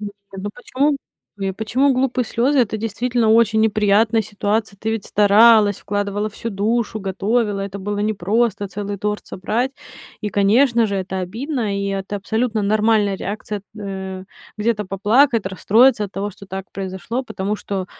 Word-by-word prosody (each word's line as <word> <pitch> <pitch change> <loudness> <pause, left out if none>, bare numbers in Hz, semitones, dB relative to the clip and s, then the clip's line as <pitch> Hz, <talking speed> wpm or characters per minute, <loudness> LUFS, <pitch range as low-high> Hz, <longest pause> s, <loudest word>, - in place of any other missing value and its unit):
Ну 200 -1 -7
почему 275 +4 0 0.6
почему 255 +6 +2
глупые 255 -1 0
слёзы? 260 +5 +2
Это 220 -2 0
действительно 230 +2 0
очень 225 -1 +4
неприятная 215 +1 +3
ситуация. 205 0 -2
Ты 220 - -3
ведь 225 -2 -2
старалась, 210 0 +5
вкладывала 205 +1 -2
всю 230 +2 -6
душу, 220 +2 -1
готовила. 205 +2 0
Это 195 0 -5
было 205 +1 -3
непросто 210 +1 0
целый 205 0 -5
торт 210 +1 -3
собрать. 230 +7 -2 0.5
И, 210 - -2
конечно 230 +3 +3
же, 200 -1 -2
это 190 0 -3
обидно, 225 - -3
и 200 - -2
это 195 +1 -3
абсолютно 220 +2 -1
нормальная 210 -1 +2
реакция 210 +1 -4
эт 200 - -19
э, 190 -2 -6 0.3
где-то 210 -2 -1
поплакать, 225 +5 +3
расстроиться 215 +5 +3
от 200 - -8
того, 200 +1 -3
что 200 +1 -14
так 190 0 -7
произошло, 195 +6 -4
потому 200 -4 -3
что, 195 -3 -4
210 Hz, 150 wpm, -20 LUFS, 200-230 Hz, 0.6 s, старалась